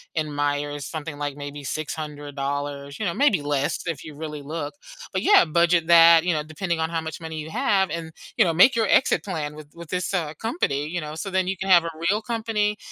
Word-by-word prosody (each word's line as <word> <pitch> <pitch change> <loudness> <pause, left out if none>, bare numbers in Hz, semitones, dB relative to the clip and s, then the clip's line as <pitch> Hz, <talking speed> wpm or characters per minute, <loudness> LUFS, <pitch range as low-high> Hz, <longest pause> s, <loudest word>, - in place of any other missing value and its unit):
in 155 -2 -1
Myers, 145 0 -2
something, 155 -2 -6
like, 145 -1 -3
maybe 145 0 -7
$600, 145 -1 -4
you 215 - -2
know, 170 - 0
maybe 260 - +3
less 145 -1 -1
if 160 -5 -3
you 155 - -9
really 150 -1 -6
look, 155 - -5 0.4
but - - -1
yeah, 410 0 +7
budget 170 +1 +2
that, 165 -1 +8
you 180 - +1
know, 150 -1 -1
depending 160 +2 -3
on 160 - 0
how 165 -1 -1
much 160 0 -6
money 160 -1 -6
you 155 +1 -6
have 190 +3 +1
and, 165 -1 -5 0.3
you - - +5
know, 165 - +1
make 185 +11 +6
your 225 -3 +2
exit - - +3
plan 155 -7 -4
with 155 -1 -11
with 170 -2 -11
this, 180 +2 -2
uh, 160 -5 -1
company, 150 - -1
you 175 +1 -3
know, 150 0 -6
so 195 +5 -5
then 185 -1 +1
you 190 -1 -2
can 195 - -4
have 175 -2 +7
a 165 - -3 0.2
real 210 +2 0
company 220 -3 -1
160 Hz, 230 wpm, -24 LUFS, 145-180 Hz, 0.4 s, that